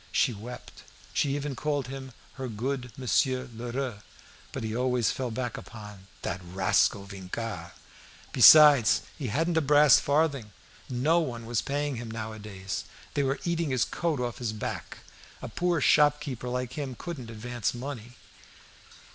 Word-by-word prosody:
She 125 - +2
wept; 120 +4 -10 0.3
she 140 -1 +1
even 145 -1 -3
called 145 -2 -1
him 135 -1 -7 0.2
"her 135 -1 -5
good 125 +3 -3
Monsieur 130 0 +1
Lheureux." 120 0 -4 0.5
But - - -5
he 110 0 -3
always 125 -1 +1
fell 130 -2 -3
back 120 +1 -3
upon 105 -4 -11 0.2
"that 90 +1 -3
rascal 95 +2 +1
Vincart." 95 -2 -6 0.6
Besides, 145 -7 +8
he 135 - -4
hadn't 165 +9 0
a - - +4
brass 145 -2 +6
farthing; 140 -7 0 0.4
no 145 +7 +2
one 120 -8 -4
was 115 -1 0
paying 145 -1 -2
him 115 0 -6
now 110 -1 -5
a 110 - -9
days; 95 -2 -5 0.3
they 145 - +1
were 135 0 0
eating 170 -2 0
his 130 -3 +2
coat 165 -5 -2
off 120 -2 -3
his 115 -3 -2
back; 110 - -6 0.4
a - - -6
poor 175 -2 0
shopkeeper 145 -4 +2
like 125 0 -3
him 135 -3 -4
couldn't 145 -10 -6
advance 120 +1 -3
money. 125 -2 -7
125 Hz, 155 wpm, -28 LUFS, 110-145 Hz, 0.6 s, Besides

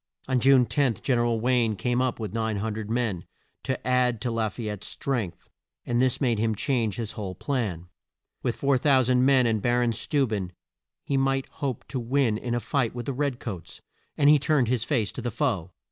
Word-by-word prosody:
On 130 -1 +2
June 130 0 +5
10, 120 +1 +1
Gen 125 -3 0
er - - +2
al 115 -1 +1
Wayne 120 -2 +2
came 120 +6 0
up 130 -2 -1
with 105 -3 -5
900 110 -1 -2
men, 110 -7 -1 0.4
to 130 - -3
add 125 -2 +2
to 125 - -1
La 115 -1 0
fay 115 +4 -8
ette's 105 -1 -5
strength, 95 -10 -3 0.4
and 120 0 +1
this 130 -1 +2
made 120 -6 +1
him 110 0 +1
change 115 -3 0
his 115 -2 -4
whole 95 -3 -5
plan. 100 - -2 0.5
With 120 - -1
4,000 130 -2 +3
men 130 -2 +5
and 110 -2 +1
Ba 120 +2 +2
ron 120 -1 +2
Steu 140 +5 +1
ben 95 -5 -3 0.5
he 140 - 0
might 135 0 +1
hope 135 -5 -4
to 130 - -2
win 120 -2 +1
in 120 0 -2
a - - +1
fight 125 -1 -1
with 120 -1 -5
the 140 - -2
red 135 -1 -1
coats, 95 -8 -7 0.4
and 145 - +4
he 150 0 +7
turned 140 -4 +2
his 125 -3 +1
face 120 -7 0
to - - -6
the 120 - -2
foe. 105 - -1
120 Hz, 205 wpm, -26 LUFS, 110-130 Hz, 0.5 s, he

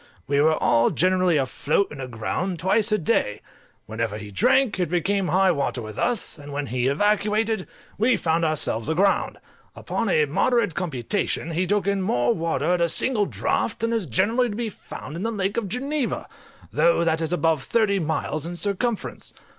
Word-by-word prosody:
We 140 +1 +2
were 155 +1 +4
all 115 -4 +3
generally 185 -1 +2
afloat 145 +7 0
and 145 - -7
aground 130 - -3
twice 205 +6 +1
a 215 - +3
day; 150 - 0 0.5
whenever 110 -1 -3
he 105 -1 -9
drank, 215 - +2
it 175 -3 0
became 185 +3 0
high 190 +1 +3
water 140 -5 -1
with 110 -1 -8
us; 235 -9 -1
and 145 0 -10
when 145 0 -3
he 125 -1 -1
evacuated, 210 +6 +1 0.3
we 230 +1 +3
found 165 -1 0
ourselves 155 -7 0
aground; 190 +5 +1 0.4
upon - - -2
a 470 -2 +3
moderate 235 - +1
computation, 165 - -2
he 175 +3 0
took 205 -1 +1
in 200 -1 0
more 120 -10 +1
water 165 0 0
at 180 - 0
a 170 - +3
single 215 +1 +2
draught 220 - -1
than 230 +1 0
is 220 -7 -1
generally 225 - +2
to 205 - -5
be 230 0 -2
found 150 -6 -9
in 170 - -5
the 225 +3 -1
Lake 200 -2 -2
of 230 -4 -1
Geneva, 275 +4 -2 0.5
though 170 0 +3
that 160 -1 +1
is 160 0 -2
above 165 -4 +1
thirty 205 - +1
miles 160 -2 -2
in 170 +2 -5
circumference. 205 +4 -3
180 Hz, 180 wpm, -24 LUFS, 150-210 Hz, 0.5 s, were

